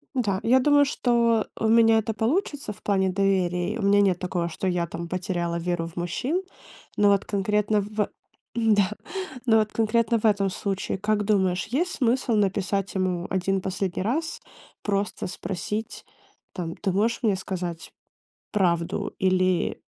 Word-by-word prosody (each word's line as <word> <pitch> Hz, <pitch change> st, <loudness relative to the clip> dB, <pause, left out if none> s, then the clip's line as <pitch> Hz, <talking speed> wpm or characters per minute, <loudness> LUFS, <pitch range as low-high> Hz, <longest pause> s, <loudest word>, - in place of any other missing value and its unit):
Да, 205 Hz, -7 st, 0 dB
я 255 Hz, +3 st, +5 dB
думаю, 290 Hz, +1 st, +5 dB
что 235 Hz, -4 st, +2 dB
у 220 Hz, -, +1 dB
меня 225 Hz, 0 st, +5 dB
это 220 Hz, 0 st, 0 dB
получится 275 Hz, -, -1 dB
в 195 Hz, -, -13 dB
плане 190 Hz, -2 st, +2 dB
доверия. 185 Hz, -1 st, +1 dB
И -, -, -4 dB
у -, -, -2 dB
меня 200 Hz, +1 st, +4 dB
нет 190 Hz, -3 st, +2 dB
такого, 180 Hz, -2 st, -2 dB
что 180 Hz, +3 st, -4 dB
я 175 Hz, -1 st, +1 dB
там 170 Hz, +1 st, -6 dB
потеряла 175 Hz, -1 st, -2 dB
веру 170 Hz, -1 st, -2 dB
в 165 Hz, -, -13 dB
мужчин. 255 Hz, -, -2 dB, 0.5 s
Но 205 Hz, -1 st, +5 dB
вот 200 Hz, -1 st, +2 dB
конкретно, 210 Hz, +1 st, +1 dB
в 210 Hz, 0 st, -2 dB, 0.5 s
да, 215 Hz, -4 st, +3 dB, 0.6 s
но 220 Hz, -1 st, +5 dB
вот 215 Hz, -1 st, 0 dB
конкретно 230 Hz, +1 st, +2 dB
в 215 Hz, -, -10 dB
этом 200 Hz, -2 st, +3 dB
случае, 195 Hz, +1 st, -3 dB
как 210 Hz, +1 st, 0 dB
думаешь, 190 Hz, -4 st, +1 dB
есть 330 Hz, -, -1 dB
смысл 245 Hz, -2 st, +1 dB
написать 200 Hz, -1 st, 0 dB
ему 185 Hz, -2 st, -1 dB
1 190 Hz, +1 st, 0 dB
последний 190 Hz, -1 st, -2 dB
раз, 320 Hz, -, -2 dB, 0.4 s
просто 200 Hz, -1 st, -1 dB
спросить, 195 Hz, +4 st, -5 dB, 0.5 s
там: 170 Hz, -3 st, -4 dB
"Ты 195 Hz, -3 st, -1 dB
можешь 225 Hz, +6 st, +1 dB
мне 205 Hz, -4 st, +2 dB
сказать 180 Hz, -3 st, -5 dB, 0.6 s
правду?" 180 Hz, +1 st, 0 dB
Или 185 Hz, -1 st, +1 dB
200 Hz, 155 wpm, -25 LUFS, 185-225 Hz, 0.6 s, я